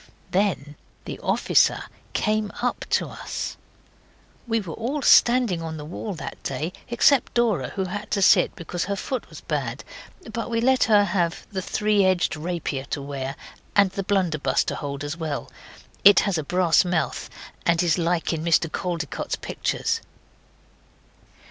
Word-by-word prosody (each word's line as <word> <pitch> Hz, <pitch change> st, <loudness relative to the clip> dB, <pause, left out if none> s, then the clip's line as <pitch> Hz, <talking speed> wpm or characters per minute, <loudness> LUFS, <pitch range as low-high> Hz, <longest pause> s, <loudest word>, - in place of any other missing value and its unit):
Then 175 Hz, -7 st, 0 dB, 0.3 s
the -, -, -6 dB
officer -, -, +2 dB, 0.3 s
came 215 Hz, -1 st, 0 dB
up 245 Hz, 0 st, -1 dB
to -, -, +2 dB
us. -, -, -5 dB, 0.9 s
We 225 Hz, -1 st, +1 dB
were 180 Hz, -7 st, -6 dB
all 265 Hz, -, -3 dB
standing 240 Hz, -10 st, +5 dB
on 160 Hz, -1 st, -5 dB
the 150 Hz, -, -7 dB
wall 185 Hz, +5 st, -5 dB
that -, -, -7 dB
day, 150 Hz, +6 st, -3 dB, 0.2 s
except 240 Hz, +3 st, +3 dB
Dora, 215 Hz, -, +2 dB
who 190 Hz, -, 0 dB
had 205 Hz, +3 st, -5 dB
to 200 Hz, -, 0 dB
sit, -, -, +5 dB
because 175 Hz, +1 st, -4 dB
her 200 Hz, +1 st, -2 dB
foot 255 Hz, +6 st, -4 dB
was -, -, -11 dB
bad, -, -, -3 dB, 0.5 s
but 230 Hz, -, -3 dB
we 230 Hz, -1 st, 0 dB
let 260 Hz, +2 st, +3 dB
her 210 Hz, -2 st, +5 dB
have 175 Hz, -4 st, -1 dB
the 190 Hz, -2 st, -2 dB
three 210 Hz, +2 st, +1 dB
edged 185 Hz, -3 st, +2 dB
rapier 155 Hz, -4 st, -3 dB
to 140 Hz, -, -3 dB
wear, 140 Hz, -1 st, -5 dB, 0.4 s
and 200 Hz, -2 st, +5 dB
the 195 Hz, -, -3 dB
blunderbuss 185 Hz, -6 st, +1 dB
to -, -, -3 dB
hold 140 Hz, -1 st, -5 dB
as 145 Hz, +3 st, -4 dB
well 155 Hz, -4 st, -4 dB, 0.5 s
it 200 Hz, -2 st, +8 dB
has 190 Hz, -5 st, 0 dB
a -, -, -3 dB
brass 175 Hz, +1 st, +3 dB
mouth 175 Hz, -2 st, -1 dB, 0.3 s
and 170 Hz, 0 st, +2 dB
is 170 Hz, 0 st, +2 dB
like 170 Hz, 0 st, 0 dB
in 160 Hz, -1 st, -3 dB
Mr 165 Hz, -1 st, +2 dB
Caldecott's 170 Hz, -3 st, -3 dB
pictures. 455 Hz, 0 st, -2 dB
180 Hz, 160 wpm, -24 LUFS, 160-210 Hz, 0.9 s, it